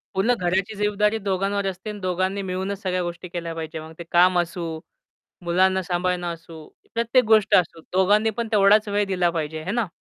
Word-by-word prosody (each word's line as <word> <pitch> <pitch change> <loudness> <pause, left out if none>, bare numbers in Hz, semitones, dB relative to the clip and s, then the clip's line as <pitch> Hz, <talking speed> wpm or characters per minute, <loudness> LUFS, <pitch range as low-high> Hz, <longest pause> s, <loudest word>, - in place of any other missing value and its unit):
पूर्ण 220 +6 +3
घराची 190 +4 0
जबाबदारी 210 +1 +1
दोघांवर 195 0 -1
असते 190 +3 -5
आणि 210 -1 -6
दोघांनी 185 +2 -1
मिळूनच 190 +1 -4
सगळ्या 185 -2 -1
गोष्टी 175 +1 -6
केल्या 170 -1 -5
पाहिजे. 160 0 -5
मग 160 +1 -10
ते - - -5
काम 180 +1 +5
असू, 165 -2 -3 0.7
मुलांना 185 +2 +2
सांभाळणं 180 0 -1
असू, 165 -1 -13 0.3
प्रत्येक 235 +2 +2
गोष्ट 215 -2 +4
असू. 165 -2 +2
दोघांनी 205 +4 +3
पण 230 -1 -1
तेवढाच 210 +1 +5
वेळ 205 0 +1
दिला 180 -2 +1
पाहिजे. 160 -1 -4
है 185 - -3
ना? 235 -1 0
185 Hz, 180 wpm, -23 LUFS, 175-205 Hz, 0.7 s, काम